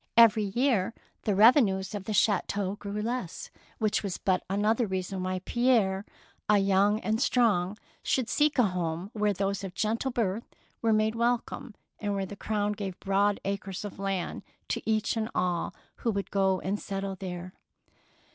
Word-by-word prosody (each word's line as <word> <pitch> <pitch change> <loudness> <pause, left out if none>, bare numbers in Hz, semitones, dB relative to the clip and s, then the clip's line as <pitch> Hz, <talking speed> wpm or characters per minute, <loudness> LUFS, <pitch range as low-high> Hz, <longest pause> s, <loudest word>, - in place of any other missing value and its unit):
Every 225 -2 +7
year 230 -1 +1 0.3
the 205 - +2
revenues 205 -3 +5
of 200 -2 -5
the - - -3
chateau 200 -1 +1
grew 205 0 -4
less, 235 -6 -4
— - - -30
which 215 -1 +1
was 195 -4 -3
but 185 -2 +1
another 215 +4 +2
reason 190 0 -3
why 185 0 -2
Pierre, 220 -6 +2 0.5
young 200 +1 +4
and 220 +2 0
strong, 210 -7 +2 0.2
should 255 -4 0
seek 295 +3 +2
a 250 - +6
home 180 -1 -2
where 210 -1 +1
those 200 0 -1
of 190 -1 -6
gentle 225 +5 0
birth 225 -3 -2 0.3
were 230 - +2
made 215 0 +3
wel 235 +1 +3
come, 235 -1 -9 0.2
and 205 -1 -1
where 195 -1 -1
the 205 - -8
Crown 210 0 -1
gave 200 -3 -5
broad 200 +1 +2
acres 195 0 -3
of 200 - -8
land 195 -2 -2 0.3
to - - -1
each 215 +1 +1
and 220 0 -1
all 180 -2 0 0.2
who 235 - -1
would 200 -3 -2
go 190 -1 +2
and 200 +2 -2
settle 195 0 -4
there. 180 -1 -6
205 Hz, 170 wpm, -29 LUFS, 190-220 Hz, 0.5 s, Every